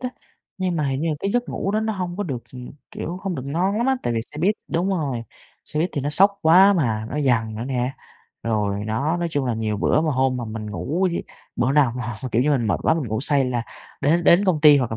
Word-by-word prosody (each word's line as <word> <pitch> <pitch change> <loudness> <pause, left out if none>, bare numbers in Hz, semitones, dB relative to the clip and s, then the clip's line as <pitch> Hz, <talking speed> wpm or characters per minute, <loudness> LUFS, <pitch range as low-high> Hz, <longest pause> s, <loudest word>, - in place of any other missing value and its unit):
á, 250 - -2 0.5
nhưng 185 -2 -1
mà 150 -3 0
hình 135 0 -1
như 165 - 0
là 155 - 0
cái 195 - -1
giấc 245 0 0
ngủ 195 - -2
đó 215 +1 +1
nó 220 0 -1
hông 180 -3 -4
có 205 - -1
được, 135 -10 -4 0.5
kiểu, 170 - -5
hông 195 -3 -2
được 135 - -4
ngon 175 +8 0
lắm 235 +3 +1
á, 265 0 +3
tại 120 - -1
vì 115 - 0
xe 150 - -8
buýt 195 +6 +3
đúng 175 +3 0
rồi, 145 -11 -1 0.4
xe 150 - -2
buýt 175 +3 0
thì 145 - -2
nó 140 - -2
xóc 200 +6 +4
quá 185 +5 +7
mà, 115 - 0
nó 150 - -2
giằng 115 -5 +1
nữa 115 - -4
nè. 125 0 -1 0.5
Rồi 105 -3 -1
nó 135 +10 0
nói 175 -1 -1
chung 145 -3 -1
là 120 - 0
nhiều 110 -1 -2
bữa 130 - +2
mà 160 -1 0
hôm 130 -1 +1
mà 120 - -4
mình 110 -1 -6
ngủ 155 - -2
với 170 - -3 0.3
bữa 125 +2 +1
nào 140 -5 +4
mà, 125 - -4 0.3
kiểu 120 - +3
như, 150 - +2
mình 130 -6 +1
mệt 105 - 0
quá, - - +3
mình 155 -7 -3
ngủ 110 +1 -1
say 140 0 +2
là 125 -2 -1 0.4
đến 165 +4 +2
đến 175 +4 +6
công 180 -6 +2
ty 150 -1 +8
hoặc 125 -4 0
là 110 - -3
145 Hz, 275 wpm, -22 LUFS, 120-175 Hz, 0.5 s, ty